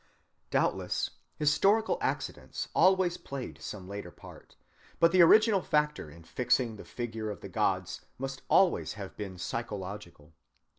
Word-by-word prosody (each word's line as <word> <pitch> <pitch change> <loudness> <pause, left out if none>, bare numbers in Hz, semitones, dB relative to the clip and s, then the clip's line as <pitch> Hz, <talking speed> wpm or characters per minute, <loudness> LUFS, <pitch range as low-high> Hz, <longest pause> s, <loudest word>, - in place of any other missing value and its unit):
Doubtless - - 0 0.3
historic 195 +9 +3 0.2
accidents - - -3
always 185 -2 +4
played 135 -2 -7
some 95 -3 -7
later 100 -2 -6
part, - - -14 0.4
but 165 - +5
the 185 0 +6
original 210 +3 +6
factor 150 - 0
in 85 +3 -14
fixing 120 +4 0
the - - -9
figure 110 -3 -5
of 105 - -6
the - - -8
gods - - -1 0.2
must 135 0 -5
always 190 -2 +3
have 100 -2 -8
been 95 -3 -6
psychological. 95 -6 -6
120 Hz, 135 wpm, -30 LUFS, 100-170 Hz, 0.4 s, the